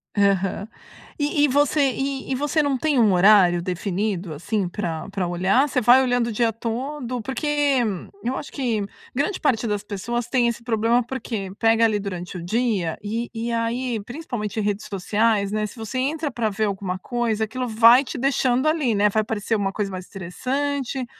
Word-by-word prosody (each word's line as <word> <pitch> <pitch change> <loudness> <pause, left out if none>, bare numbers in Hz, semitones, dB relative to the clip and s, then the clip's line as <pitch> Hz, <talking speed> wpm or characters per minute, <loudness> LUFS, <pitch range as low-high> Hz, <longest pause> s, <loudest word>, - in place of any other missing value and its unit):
Aham. 200 0 +1 0.5
E 290 0 +1
e - - +6
você 285 0 +3
e 270 +1 -3
e - - +1
você 295 +3 +1
não 275 -2 +1
tem 290 -2 +1
horário 190 -3 +5
definido 185 -1 -2
assim 190 +5 -2
pra 170 -4 -4
pra 195 -3 -2
olhar? 190 +11 +2
Você 255 - 0
vai 245 +3 +7
olhando 245 -2 +1
o - - -2
dia 230 +1 +1
todo? 245 +2 -4
Porque 265 +5 -4 0.8
eu 255 +2 -1
acho - - -6
que 235 -7 -1 0.3
grande 290 +9 -1
parte 235 -6 +1
das 205 -1 -2
pessoas 225 +4 -3
tem 245 -3 +2
esse 235 0 -3
problema, 230 +1 +2
porque? 225 -6 -5
Pega 225 0 +4
ali 210 -2 +1
durante 180 -2 -5
o 170 - -7
dia 205 -4 0
e 230 +3 -3
e 230 +1 -3
aí 230 +1 -1
principalmente 240 - -5
redes 205 +1 -2
sociais, 205 +1 +1
né, 215 0 0
se - - -13
você 225 +3 -5
entra 295 +2 -1
pra 230 -3 -1
ver 215 +2 -1
alguma 190 -2 -3
coisa, 230 -1 -1
aquilo 250 +3 -3
vai 230 +4 +6
te 260 - -6
deixando 260 +1 +1
ali, 295 -9 +1
né? 205 +1 +4
Vai 215 +1 +1
parecer 220 0 -2
uma 195 -2 0
coisa 200 -2 -2
mais 185 -1 -7
interessante. 260 +7 -3
225 Hz, 180 wpm, -23 LUFS, 200-255 Hz, 0.8 s, vai